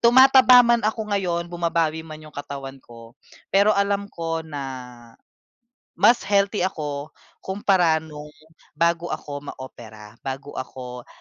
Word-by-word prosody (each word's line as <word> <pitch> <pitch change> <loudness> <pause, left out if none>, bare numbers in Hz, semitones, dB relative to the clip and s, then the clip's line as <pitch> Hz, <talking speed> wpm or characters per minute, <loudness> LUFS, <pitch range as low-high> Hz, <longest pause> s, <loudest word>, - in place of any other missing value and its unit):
tumataba 255 0 +7
man 235 0 +3
ako 215 0 -2
ngayon, 175 -4 0
bumabawi 165 -2 0
man 155 -1 -9
yung 155 - -13
katawan 140 -1 -7
ko, 115 -1 -14 0.4
pero 200 +2 +5
alam 200 0 0
ko 165 -3 -3
na 150 -3 -7 1.3
mas 235 -4 +4
healthy 200 -1 +2
ako 150 -4 -5 0.2
kumpara 185 -5 +1
nung 150 -1 -10 0.5
bago 170 +2 +1
ako 145 -4 -5 0.2
maopera, 110 -4 -12
bago 135 +2 -5
ako 125 -1 -8
165 Hz, 125 wpm, -23 LUFS, 140-200 Hz, 1.3 s, tumataba